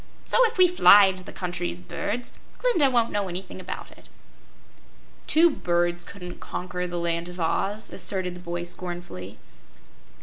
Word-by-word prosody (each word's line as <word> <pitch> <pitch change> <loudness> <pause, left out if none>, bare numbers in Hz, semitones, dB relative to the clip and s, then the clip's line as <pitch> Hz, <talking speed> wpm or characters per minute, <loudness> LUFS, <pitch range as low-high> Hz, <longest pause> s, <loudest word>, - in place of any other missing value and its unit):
So, - - +4
if 455 - -8
we 365 -1 +7
fly 205 - +8
into 190 -1 -1
the - - -10
country 180 -1 -3
as 175 - -6
birds, 215 +6 -4 0.2
Glinda 385 - +3
won't 235 -3 +2
know 205 -1 -1
anything 185 +1 -7
about 185 - -7
it." - - -17 1.2
"Two 335 +2 +5
birds 175 -6 0
couldn't 180 -3 -9
conquer 180 0 -4
the 175 0 -4
Land 170 0 -1
of 180 0 -9
Oz," 195 +6 -1
asserted 185 -2 0
the - - -9
boy, 175 -1 -4
scornfully. 175 - -5
180 Hz, 160 wpm, -25 LUFS, 175-205 Hz, 1.2 s, fly